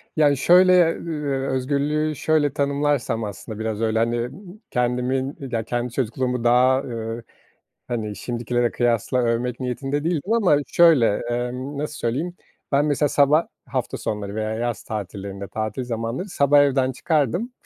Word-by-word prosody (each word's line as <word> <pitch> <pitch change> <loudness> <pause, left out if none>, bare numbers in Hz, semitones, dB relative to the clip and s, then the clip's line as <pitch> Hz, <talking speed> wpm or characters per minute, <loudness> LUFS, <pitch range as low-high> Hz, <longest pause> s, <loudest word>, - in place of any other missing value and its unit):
Ya, 145 -2 +4
şöyle, 180 +2 +5
ııı, 145 -5 -3
özgürlüğü 145 +3 0
şöyle 145 -1 +1
tanımlarsam 140 -5 0
aslında 105 +1 -7
biraz 110 -1 -3
öyle, 110 0 +1
hani, 120 +1 0 0.4
kendimin, 125 +2 -1
ya 115 -1 -1
kendi 120 +1 -3
çocukluğumu 125 0 -1
daha, 125 +2 +4
ııı, 115 -1 -5 0.7
hani, 110 -4 -3
şimdikilere 120 +1 -1
kıyasla 120 +1 0
övmek 120 +1 0
niyetinde 135 +4 -2
değildim 175 +5 -1
ama 200 -10 +4
şöyle, 150 -12 +4
emm, 125 +4 -3
nasıl 150 +1 -3
söyleyeyim, 150 +9 -2 0.4
ben 140 +2 +4
mesela 150 0 +1
sabah 145 +4 +3 0.2
hafta - - -3
sonları 105 -1 -4
veya 110 0 -2
yaz 120 +1 -3
tatillerinde, 100 -1 -6
tatil 110 +4 -3
zamanları 115 - -3
sabah 145 -3 +3
evden 135 -2 +2
çıkardım 160 - 0
125 Hz, 135 wpm, -23 LUFS, 115-145 Hz, 0.7 s, şöyle